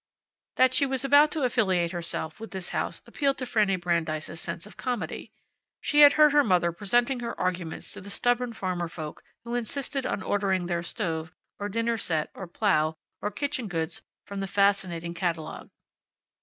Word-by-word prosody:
That 255 0 +5
she 280 +2 +4
was 265 0 -1
about 285 +2 +7
to 300 -2 -2
affiliate 190 -9 +2
herself 170 -1 -4
with 225 - -7
this 190 -2 -6
house - - -3
appealed 280 -2 0
to 255 - -3
Fanny 210 -5 +2
Brandeis's 170 -2 -2
sense 170 +1 -5
of 210 - -13
comedy. 245 -3 -4 0.5
She 295 - +1
had 290 -1 +10
heard 305 -1 +6
her 290 0 +5
mother 180 -5 +3
presenting 240 +8 +1
her 235 -1 -5
arguments 180 -3 -2
to - - -6
the 200 - -9
stubborn 245 +3 +1
farmer 180 -4 -2
folk 155 -2 -7 0.2
who 235 +1 -6
insisted 260 +3 -2
on 195 - -2
ordering 190 -3 +1
their 175 -1 -1
stove, 170 -2 -3 0.2
or 205 0 -3
dinner 230 +2 0
set, 160 -5 -1
or 190 - -7
plow, 160 -4 +1 0.3
or 205 - -1
kitchen 265 +1 -3
goods 165 -4 -3 0.2
from 200 0 -6
the 195 - -2
fascinating 190 -4 +1
catalogue. 170 -3 -3
200 Hz, 175 wpm, -27 LUFS, 175-245 Hz, 0.5 s, had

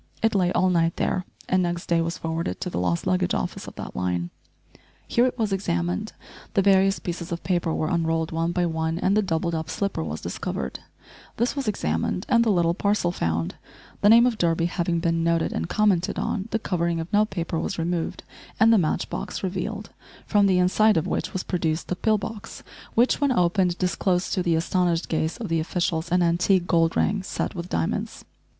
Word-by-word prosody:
It 225 0 +3
lay 180 -3 +2
all 185 0 +3
night 165 -1 +2
there, 185 -1 -1 0.2
and 185 0 +2
next 175 0 -2
day 170 -1 +2
was 165 +1 -2
forwarded 160 - -3
to - - -3
the 85 - -2
lost 90 -1 0
luggage 185 0 +1
office 190 +2 -3
of - - -9
that - - -7
line. 90 -1 -2 0.8
Here 240 +2 +3
it 250 - -4
was 215 -4 0
examined; 90 - -1 0.4
the 195 - +4
various 195 0 +4
pieces 175 0 -5
of 170 - -4
paper 175 -3 0
were 155 - -1
unrolled 165 -1 0
one 165 +1 0
by 175 0 +1
one 160 0 -1
and 195 +3 +1
the 215 - +4
doubled 170 -3 -1
up 160 -2 -3
slipper 200 - -2
was 80 0 -4
discovered; 65 -1 -4 0.6
this 240 +4 0
was 275 -4 -3
examined, 80 - -1
and 235 -2 +5
the 230 - +1
little 170 -4 +3
parcel 200 -1 +1
found; 85 - -1 0.5
the 205 - +5
name 230 +2 +8
of 240 -3 0
Durby 165 -1 +2
having 170 0 -1
been 165 -1 +1
noted 165 0 +1
and 80 +1 -3
commented 205 -3 +2
on, 200 0 -2
the 225 - 0
covering 170 -5 -1
of 165 +4 -6
note 210 +1 +3
paper 170 -3 -3
was - - -3
removed, 165 0 -2 0.4
and 225 +1 +6
the 220 - +5
match 155 -4 0
box - - -5
revealed, 200 +3 -4 0.3
from 205 -2 +3
the 185 -2 +3
inside 200 +3 +4
of 160 - +1
which - - -2
was 185 - -3
produced 160 -3 -2
the 180 - 0
pill 215 +4 +2
box, 205 +1 -7 0.3
which, 245 +5 +3
when 285 -2 +3
opened, 180 -3 +2
disclosed 180 0 0
to 185 - +1
the 170 -2 +1
astonished 170 0 +1
gaze 160 0 -1
of 235 -3 -5
the 165 0 0
officials 170 0 -1
an 180 0 +3
antique 175 +2 +2
gold 165 -2 +2
ring 200 0 +1
set 190 - -3
with 175 0 -6
diamonds! 80 - -2
175 Hz, 205 wpm, -25 LUFS, 165-195 Hz, 0.8 s, name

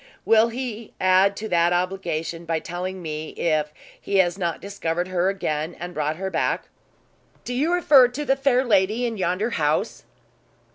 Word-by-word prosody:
"Will 225 0 +5
he 230 -2 -6
add 185 +2 +4
to 220 +1 -5
that 170 0 +3
obligation 175 -2 -2
by 165 -1 0
telling 180 +2 -5
me 155 -1 -5
if 155 -2 0 0.3
he 200 - -3
has 175 -3 +3
not 170 -4 -2
discovered 180 -3 -3
her 185 0 +1
again, 160 -4 -3
and 175 +1 -6
brought 155 0 -1
her 190 +3 -4
back?" - - -1 0.8
"Do 245 - -4
you 290 +7 +1
refer 295 -8 +6
to 270 +5 -5
the 270 0 +3
fair 270 -2 +2
lady 215 +2 +2
in 230 -2 -3
yonder 190 +5 -1
house?" 150 -6 -1
185 Hz, 170 wpm, -23 LUFS, 170-225 Hz, 0.8 s, refer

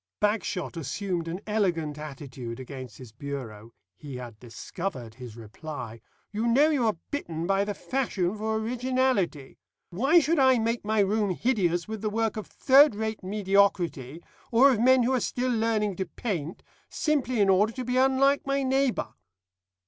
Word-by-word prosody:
Bagshot 210 -4 -1
assumed 170 +3 -3
an 175 +4 -4
elegant 170 -8 -1
attitude 135 -5 -7
against 130 -4 -8
his 125 -4 -11
bureau. 115 -4 -7 0.2
He 145 -4 -9
had 120 -3 -8
discovered 125 - -6
his 120 -2 -10
reply. 115 0 -8 0.3
"You 215 +3 -1
know 280 +7 +4
you 260 -6 +1
are 215 - 0
bitten 170 - -3
by 195 +2 +1
the 205 -1 -3
fashion 215 -8 -1
for 220 +1 -2
originality. 235 - -1 0.3
Why 270 - +4
should 320 +1 +1
I 260 -1 +5
make 230 +1 -1
my 215 0 +2
room 205 +1 +1
hideous 175 -9 0
with 220 -1 -5
the 215 - -1
work 225 0 -1
of 215 - -6
third 275 -2 +5
rate 220 0 -3
mediocrity, 185 -7 +1 0.3
or 260 +4 +6
of 235 - 0
men 255 +1 +5
who 255 +3 +1
are 255 - +2
still 250 +1 -1
learning 220 -4 0
to 190 - -2
paint, 170 -5 -4 0.3
simply 265 -6 0
in 200 - +4
order 200 +3 +4
to 255 0 -5
be 250 +1 0
unlike 270 +2 +3
my 275 0 +1
neighbour?" 265 -1 0
205 Hz, 165 wpm, -27 LUFS, 155-245 Hz, 0.3 s, or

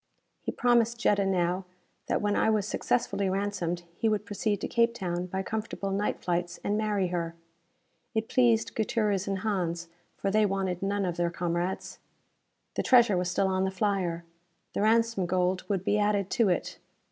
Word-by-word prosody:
He - - -3
promised 235 -1 +2
Jetta 200 -4 +2
now 180 0 +1 0.4
that - - 0
when 205 0 +1
I - - +3
was 210 -2 +1
successfully 200 -4 0
ransomed 185 -3 -2 0.2
he 225 - +2
would 210 -1 0
proceed 205 -1 -1
to - - -2
Cape 235 0 +2
Town 180 -3 -2
by 190 +1 -3
comfortable 210 -2 -3
night 200 +2 -1
flights 175 0 -1
and 205 - 0
marry 210 -4 0
her. 170 -1 -2 0.8
It 220 0 0
pleased 235 -3 +3
Gutierrez 210 -3 0
and 195 -1 0
Hans, 175 -5 -1 0.3
for 195 - -1
they 215 +1 +4
wanted 190 -2 -2
none 200 0 0
of 175 -2 -2
their 175 0 +1
comrades. 175 +2 -3 0.7
The - - -1
treasure 240 -6 +5
was 180 0 0
still 190 +2 +1
on 190 0 +1
the 190 - +1
flyer. 190 -3 -1 0.5
The - - -1
ransom 225 -3 +2
gold 180 +1 0
would 195 -3 0
be 210 - +2
added 205 -2 +1
to 230 -6 +3
it. 180 - -1
195 Hz, 175 wpm, -28 LUFS, 180-215 Hz, 0.8 s, treasure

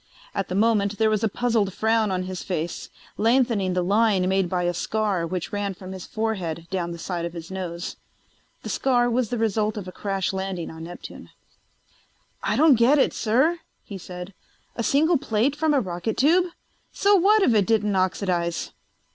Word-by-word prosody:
At 195 - -2
the 180 - -4
moment 205 -1 +2
there 220 -1 +3
was 215 0 0
a 220 - +2
puzzled 225 -3 0
frown 220 -1 +2
on 185 -1 -1
his 185 0 -5
face, 175 -2 -4 0.3
lengthening 230 -5 +2
the 180 - +1
line 200 -1 +2
made 190 -1 +1
by 180 0 0
a 175 0 0
scar 200 -2 -1
which 180 +2 -4
ran 200 -1 -2
from 185 +1 -9
his 190 -1 -8
forehead 185 -7 -3
down 180 -3 -1
the 170 - -6
side 170 0 -4
of 170 0 -4
his 170 +1 -8
nose. 175 -2 -5 0.7
The - - -5
scar 245 -2 +2
was 240 -2 0
the 245 - -2
result 215 -1 0
of 195 -3 -6
a - - -6
crash 195 0 -2
landing 190 -3 -4
on 160 0 -8
Neptune. 175 +1 -10 1.1
"I - - 0
don't 295 -6 +5
get 255 +6 +5
it, 275 - +3
sir," 265 +10 +2 0.2
he 200 -2 -8
said. 180 +2 -8 0.4
"A - - -2
single 305 +6 +3
plate 255 +1 0
from 315 +1 +1
a 285 - +4
rocket 185 +1 -3
tube... 345 +6 +4 0.4
So 405 +1 +3
what 400 +3 +5
if 245 - +4
it 205 -4 +3
didn't 210 -3 +2
oxidize?" 180 -2 -1
205 Hz, 190 wpm, -24 LUFS, 185-230 Hz, 1.1 s, don't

